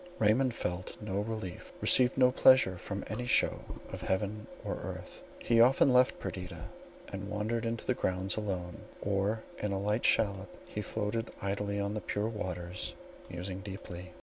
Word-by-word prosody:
Raymond 115 +4 +3
felt 90 +1 -4
no 100 -2 -2
relief, 105 -4 -5
received 125 0 +6
no 125 -1 +6
pleasure 130 -7 +6
from 100 +2 -5
any 120 +3 -4
show - - +3 0.3
of - - -5
heaven 105 +3 -1 0.2
or - - -2
earth. - - -7 0.2
He 115 -1 +3
often 130 +2 +6
left 125 +1 +4
Perdita, 90 -3 -6 0.5
to 100 - -4
wander 105 +3 -2
in 115 0 -1
the 130 - +2
grounds 95 -4 -1
alone; 95 -5 -3 0.2
or 100 +2 0 0.2
in 105 - -1
a 95 - 0
light 105 +3 0
shallop 100 -3 +2 0.2
he 105 - -4
floated 110 +2 -2
idly 100 +1 -1
on 100 +1 -1
the 105 - -3
pure 105 +2 -1
waters, 90 -5 -4 0.3
musing 90 +2 -5
deeply. 90 -2 -8
105 Hz, 160 wpm, -32 LUFS, 95-115 Hz, 0.5 s, received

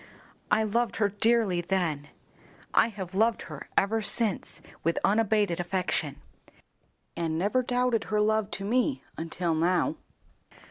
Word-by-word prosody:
I 220 +1 +3
loved 230 +2 0
her 205 -2 +2
dearly 205 -3 +2
then. 170 -6 -1 0.7
I - - +5
have 195 -5 -7
loved 225 +4 +2
her - - -9
ever 220 +3 +2
since 220 -2 -1 0.2
with 165 +1 +1
unabated 210 -4 +2
affection, 175 -5 -2 1.0
and 165 -2 -1
never 205 +9 +1
doubted 250 -2 0
her 210 -1 0
love 215 0 +2
to 195 - -6
me 255 +6 +1
until 165 +1 0
now." 180 - +1
205 Hz, 130 wpm, -28 LUFS, 175-225 Hz, 1.0 s, I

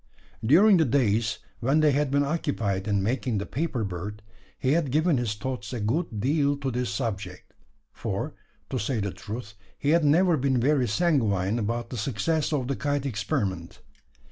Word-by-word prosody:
During 185 - +6
the 160 - +4
days 110 -4 +1 0.2
when 135 +5 +2
they 150 -1 +5
had 145 0 +1
been 140 +1 +2
occupied 115 - -1
in 100 -2 +1
making 120 +1 0
the 100 - -2
paper 140 -5 -2
bird, 100 +2 -5 0.3
he 130 - 0
had 155 -2 +2
given 155 +2 +2
his 115 -4 -1
thoughts 125 -2 -5
a 120 - -3
good 110 +2 -1
deal 140 +4 +2
to 135 -1 -2
this 125 0 -1
subject; 100 -7 -4 0.4
for, - - -3 0.4
to - - -1
say 110 +3 -1
the 100 -1 -2
truth, 105 +2 -7 0.2
he 145 - +1
had 170 0 +4
never 165 +3 +4
been 130 -2 +1
very 135 0 +2
sanguine 110 - +1
about 115 +2 -2
the 125 - -4
success 140 +8 0
of 135 -5 0
the 140 - -1
kite 145 0 -1
experiment. 100 -7 -2
125 Hz, 175 wpm, -26 LUFS, 105-145 Hz, 0.4 s, During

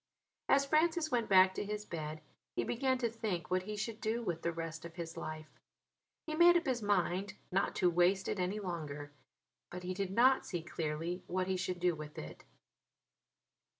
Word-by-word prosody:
As 275 0 +5
Francis 315 +2 +2
went 235 -3 +1
back 190 -1 +7
to - - -3
his 210 +1 -4
bed 155 -3 -5 0.3
he 120 - +1
began 260 - +1
to 240 -2 0
think 210 -7 -3
what 185 0 +3
he 210 +3 -5
should 220 +1 -4
do 230 +2 -1
with 175 -6 -2
the 170 - 0
rest 165 -1 -5
of 170 0 -9
his 170 -2 -6
life. 155 0 -7 0.7
He 310 - -4
made 345 +2 +7
up 340 - -2
his 255 -4 0
mind 195 -1 +1 0.2
not 195 +2 +1
to 180 - +3
waste 180 +3 +3
it - - -1
any 185 +4 -1
longer: 150 -6 -5 0.6
but 180 +1 -7
he 185 +1 -2
did 195 0 -2
not 250 +7 +5
see 175 -3 -4
clearly 165 +2 -3
what 185 +1 0
he 190 0 0
should 185 -1 -2
do 180 0 +3
with 155 -1 -8
it. 75 - -8
185 Hz, 190 wpm, -34 LUFS, 170-225 Hz, 0.7 s, back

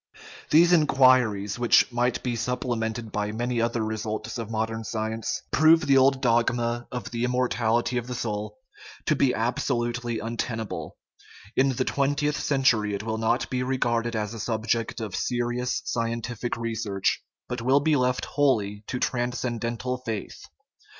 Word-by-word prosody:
These 170 +3 +6
inquiries, 130 - +4
which 120 +1 +4
might 120 +1 0
be 125 -2 -1
supplemented 115 -2 -2
by 105 0 -2
many 120 +2 -1
other 115 -1 0
results 110 +2 -4
of 115 -2 -5
modern 110 0 -2
science, 110 0 -3
prove 160 +2 +6
the 140 -2 +3
old 135 0 +3
dogma 120 0 +1
of 125 -2 -5
the 120 0 -2
immortality 125 -1 +1
of 120 0 -3
the 125 - -4
soul 105 - -4 0.5
to 155 - +2
be 135 -2 +3
absolutely 120 0 -1
untenable; 115 0 -4 0.6
in 135 +1 +4
the 130 +1 -1
twentieth 145 +1 0
century 115 -7 +2
it 100 - -5
will 110 0 -2
not 115 +2 +1
be 125 -1 0
re 130 +1 -1
garded 120 -1 0
as 105 0 -2
a 115 - -7
subject 115 +1 -1
of 105 -4 -4
serious 120 0 -1
scientific 115 0 -2
research, 110 -4 -1 0.3
but 125 -1 -4
will 130 +4 +4
be 155 +1 +2
left 125 -1 +1
wholly 110 -8 +1
to 125 - -3
transcendental 120 0 -2
"faith." 115 -5 -6
120 Hz, 150 wpm, -26 LUFS, 110-125 Hz, 0.6 s, These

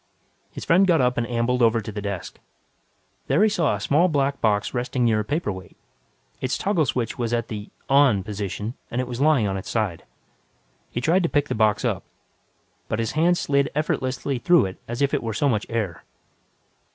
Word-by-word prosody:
His - - -8
friend 185 +3 +4
got 170 -3 +4
up 125 -1 +2
and 115 - -1
ambled 120 +1 0
over 115 0 +4
to 110 0 -6
the 105 0 -5
desk. 100 -3 -5 0.9
There 150 +10 +3
he 220 - +5
saw 165 - +1
a - - -5
small 150 - +3
black 140 -4 0
box 105 -2 +1
resting 125 0 -1
near 110 -2 +3
a - - 0
paperweight. 105 - -4 0.6
Its 130 - -1
toggle 175 -8 +1
switch 120 +2 -2
was 120 -1 -1
at 115 -1 -1
the 105 -1 -6 0.2
"on" 135 -8 +4
position, 105 +2 -4 0.2
and 120 - -3
it 130 - 0
was 125 +1 -5
lying 150 -7 +4
on 95 0 -2
its 95 - -7
side. 105 -7 -1 0.9
He 120 - -3
tried 170 +8 +3
to 170 - 0
pick 145 0 0
the - - 0
box 110 -1 +2
up, - - 0 0.9
but 110 - -2
his 115 -1 -1
hand 170 +3 +3
slid 140 -3 +1
effortlessly 135 -3 -1
through 175 - +4
it 95 0 -7
as 120 +4 -2
if 140 - +1
it 145 - +1
were 115 -2 -4
so 145 - +1
much 110 -5 0
air. 105 -7 -3
120 Hz, 200 wpm, -24 LUFS, 110-145 Hz, 0.9 s, he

